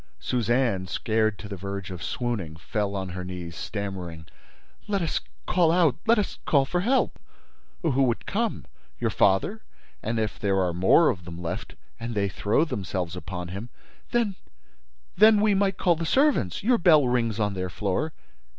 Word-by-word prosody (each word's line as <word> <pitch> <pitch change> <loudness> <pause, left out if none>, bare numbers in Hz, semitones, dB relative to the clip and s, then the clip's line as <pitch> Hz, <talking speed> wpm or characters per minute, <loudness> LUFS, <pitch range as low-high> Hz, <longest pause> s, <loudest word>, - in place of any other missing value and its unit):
Suzanne, 120 -5 +1
scared 110 +2 0
to 105 - -8
the 100 - -5
verge 100 0 -5
of 90 -2 -7
swooning, 110 -11 -3
fell 100 +4 -2
on 95 -1 -3
her 90 +1 -5
knees, 90 -2 -6
stammering: 90 -4 -5 0.6
"Let 200 -3 0
us 165 - -1 0.2
call 175 -3 +3
out—let 175 - +3
us 210 - -2
call 140 -5 +4
for 175 +6 -1
help—" 255 +7 +1 0.6
"Who 135 -5 +2
would 120 -3 +1
come? 225 +2 -1 0.3
Your 115 -2 0
father—and 110 - -1
if 110 -1 -2
there 100 -2 +1
are 90 -2 +1
more 95 - +5
of 90 - -7
them 85 0 -8
left—and 85 - -6
they 100 -1 +1
throw 105 +10 +1
themselves 95 - -3
upon 90 0 -6
him—?" 100 +6 -6 0.4
"Then—then—we 200 - +1
might 195 -1 +1
call 175 -2 +3
the 165 0 -3
servants—Your 250 - +2
bell 155 -6 +6
rings 115 -3 0
on 105 -1 +1
their 95 -1 -3
floor." 100 - -1
110 Hz, 150 wpm, -26 LUFS, -, 0.6 s, bell